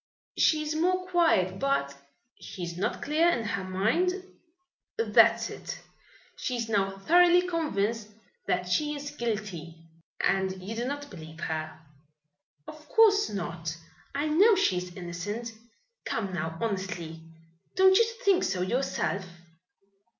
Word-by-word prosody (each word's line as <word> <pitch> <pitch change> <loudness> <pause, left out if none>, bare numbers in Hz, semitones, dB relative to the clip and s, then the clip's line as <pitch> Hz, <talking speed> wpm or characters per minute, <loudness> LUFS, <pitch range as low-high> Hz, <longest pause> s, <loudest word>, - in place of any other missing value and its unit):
She 310 -1 +3
is 305 0 -2
more 365 +3 +1
quiet, 320 - +2
but 275 - 0 0.3
" 250 - -37
"She 180 - -7
is 170 0 -5
not 185 - -2
clear 315 +4 +3
in 240 -9 0
her 205 -3 -2
mind?" 290 - 0 0.7
"That's 455 - +4
it. - - -7 0.6
She 255 - -3
is 230 -2 -2
now 195 -2 0
thoroughly 350 - +5
convinced 230 - -1 0.4
that 180 0 0
she 295 +11 0
is 290 0 -6
guilty." 200 - -4 0.5
"And 190 -1 +1
you 200 +5 -6
do 235 +2 -2
not 285 +2 -5
believe 160 -3 -10
her?" 155 -1 -4 0.9
"Of 305 -1 -12
course 425 -2 +5
not. 170 -4 -4 0.4
I 290 +2 0
know 395 +9 +5
she 270 - +2
is 180 0 -4
innocent. 200 +6 -5 0.5
Come 195 -4 -2
now, 160 -1 -3
honestly, 185 -6 -4 0.5
don't 380 0 +6
you 460 - +6 0.2
think 390 -2 +4
so 185 -2 0
yourself?" 200 -2 -1
225 Hz, 135 wpm, -28 LUFS, -, 0.9 s, don't